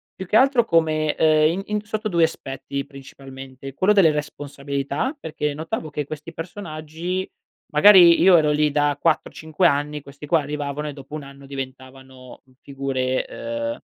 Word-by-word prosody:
Più 190 Hz, -, -7 dB
che 210 Hz, -, -1 dB
altro 265 Hz, -2 st, +4 dB
come 155 Hz, -5 st, +1 dB
ehm, 155 Hz, 0 st, +4 dB
in 185 Hz, +3 st, -3 dB
in 210 Hz, 0 st, -2 dB
sotto 215 Hz, +1 st, -4 dB
2 170 Hz, -5 st, +2 dB
aspetti 140 Hz, -3 st, -3 dB
principalmente: 135 Hz, -1 st, -11 dB
quello 185 Hz, +9 st, +2 dB
delle 180 Hz, -6 st, +5 dB
responsabilità, 145 Hz, -, -4 dB
perché 150 Hz, -, -3 dB
notavo 160 Hz, +3 st, -5 dB
che 145 Hz, -1 st, -4 dB
questi 155 Hz, +2 st, -8 dB
personaggi 165 Hz, +1 st, -5 dB, 0.4 s
magari 175 Hz, +1 st, +7 dB
io 180 Hz, -1 st, +7 dB
ero 150 Hz, -1 st, +2 dB
lì 150 Hz, 0 st, +2 dB
da 145 Hz, 0 st, +1 dB
4 165 Hz, -2 st, +1 dB
o -, -, -25 dB
5 160 Hz, +3 st, +1 dB
anni, 150 Hz, 0 st, -1 dB
questi 140 Hz, +1 st, -12 dB
qua 165 Hz, +1 st, +3 dB
arrivavano 145 Hz, 0 st, -4 dB
e 145 Hz, -, -5 dB
dopo 140 Hz, +1 st, -10 dB
1 155 Hz, -, -6 dB
anno 140 Hz, 0 st, -13 dB
diventavano 130 Hz, -1 st, -10 dB, 0.2 s
figure, 135 Hz, -2 st, -2 dB, 0.5 s
uhm, -, -, -16 dB
150 Hz, 165 wpm, -22 LUFS, 140-165 Hz, 0.5 s, magari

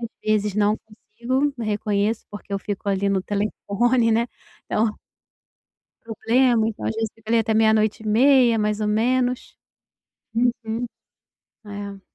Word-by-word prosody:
às 230 Hz, -, -4 dB
vezes 210 Hz, -2 st, 0 dB
não 210 Hz, +1 st, +3 dB
consigo, 245 Hz, +6 st, -3 dB
reconheço, 210 Hz, +1 st, -1 dB
porque 205 Hz, 0 st, -10 dB
eu 200 Hz, -, 0 dB
fico 205 Hz, +1 st, -5 dB
ali 200 Hz, 0 st, +1 dB
no 195 Hz, -1 st, +1 dB
telefone 215 Hz, +4 st, 0 dB
né, 230 Hz, +2 st, +2 dB, 0.4 s
então 215 Hz, 0 st, -1 dB, 1.0 s
problema, 230 Hz, 0 st, +2 dB
então, 215 Hz, -, -6 dB
às -, -, -1 dB
vezes, 225 Hz, -1 st, -2 dB, 0.3 s
até 220 Hz, 0 st, 0 dB
meia 220 Hz, 0 st, +4 dB
noite 215 Hz, 0 st, 0 dB
e 220 Hz, -, -9 dB
meia 245 Hz, +1 st, +5 dB
mais 210 Hz, 0 st, 0 dB
ou 210 Hz, -, 0 dB
menos. 245 Hz, +3 st, 0 dB, 0.8 s
Uhum. 235 Hz, -1 st, 0 dB, 0.8 s
É. 200 Hz, -1 st, -7 dB
220 Hz, 135 wpm, -23 LUFS, 210-235 Hz, 1.0 s, meia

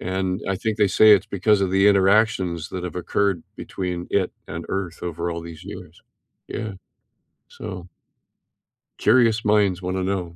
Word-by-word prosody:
and 95 Hz, +1 st, -2 dB
I 95 Hz, -, 0 dB
think 110 Hz, +1 st, -3 dB
they 105 Hz, -, +4 dB
say 110 Hz, +3 st, +6 dB
it's 100 Hz, -1 st, +4 dB
because 100 Hz, +1 st, +2 dB
of 95 Hz, -2 st, 0 dB
the 95 Hz, +1 st, +3 dB
interactions 95 Hz, -4 st, +2 dB
that 90 Hz, -1 st, -5 dB
have 90 Hz, -, -6 dB
occurred 90 Hz, 0 st, 0 dB
between 90 Hz, -2 st, -5 dB
it 95 Hz, -2 st, +1 dB, 0.2 s
and 85 Hz, +1 st, -6 dB
Earth 95 Hz, -3 st, -4 dB
over 85 Hz, 0 st, -3 dB
all 85 Hz, 0 st, -4 dB
these 85 Hz, -1 st, -10 dB
years. -, -, -10 dB, 0.5 s
Yeah. 110 Hz, -2 st, -4 dB, 0.8 s
So 90 Hz, -1 st, -8 dB, 1.1 s
curious 115 Hz, -1 st, +3 dB
minds 100 Hz, -3 st, +2 dB
want 90 Hz, +1 st, -3 dB
to 95 Hz, -, -1 dB
know. 90 Hz, -3 st, -3 dB
95 Hz, 160 wpm, -23 LUFS, 90-100 Hz, 1.1 s, say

